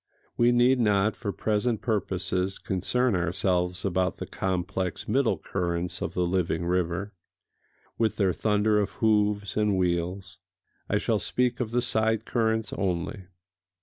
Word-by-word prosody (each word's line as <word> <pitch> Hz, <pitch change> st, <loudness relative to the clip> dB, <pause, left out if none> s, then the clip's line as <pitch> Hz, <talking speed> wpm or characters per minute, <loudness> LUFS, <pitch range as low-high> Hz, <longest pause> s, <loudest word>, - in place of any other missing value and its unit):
(We 120 Hz, 0 st, +4 dB
need 125 Hz, +2 st, +4 dB
not 105 Hz, -2 st, +2 dB
for 105 Hz, -4 st, -3 dB
present 110 Hz, +2 st, 0 dB
purposes 95 Hz, -4 st, -1 dB
concern 115 Hz, +5 st, 0 dB
ourselves 90 Hz, 0 st, 0 dB
about 95 Hz, -1 st, 0 dB
the -, -, -5 dB
complex 95 Hz, 0 st, -3 dB
middle 130 Hz, +3 st, +2 dB
currents 90 Hz, -1 st, -3 dB
of -, -, -3 dB
the 90 Hz, -, +1 dB
living 85 Hz, -2 st, 0 dB
river, 90 Hz, +3 st, -1 dB, 0.9 s
with 115 Hz, -1 st, +1 dB
their 95 Hz, -3 st, +2 dB
thunder 105 Hz, +1 st, +2 dB
of 100 Hz, -1 st, -1 dB
hoofs 105 Hz, -2 st, +1 dB
and 105 Hz, -2 st, +2 dB
wheels: 90 Hz, +1 st, -2 dB, 0.5 s
I -, -, +2 dB
shall -, -, +1 dB
speak 125 Hz, -1 st, 0 dB
of 120 Hz, -3 st, -1 dB
the 120 Hz, +1 st, 0 dB
side 110 Hz, -2 st, +1 dB
currents 110 Hz, -2 st, 0 dB
only.) 95 Hz, +1 st, -2 dB
100 Hz, 140 wpm, -27 LUFS, 90-110 Hz, 0.9 s, We